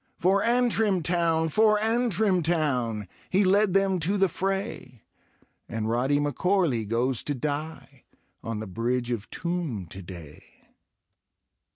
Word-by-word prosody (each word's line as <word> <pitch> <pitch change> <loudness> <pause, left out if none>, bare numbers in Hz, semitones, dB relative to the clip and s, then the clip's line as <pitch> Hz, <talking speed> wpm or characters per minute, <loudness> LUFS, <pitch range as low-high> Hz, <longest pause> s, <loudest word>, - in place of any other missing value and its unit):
For 195 +3 +2
Antrim 225 -6 +2
town! 165 -1 +1
for 215 +4 +4
Antrim 220 -4 +2
town 135 -10 0
I - - -16 0.2
He 195 +2 +3
led 195 0 +3
them 195 -1 +2
to 185 +6 +1
the 195 0 +4
fray 190 - -4 0.3
— - - -38
And 110 -1 -3
Rody 130 +5 +1
M'Corley 145 - 0
goes 120 +3 0
to 145 - -3
die 150 +4 -5 0.4
On 115 -1 -4
the 110 - -5
Bridge 120 +5 -2
of 110 -3 -4
Toome 165 - -3
to 95 - -9
day. 85 -5 -12
160 Hz, 140 wpm, -26 LUFS, 120-195 Hz, 0.4 s, for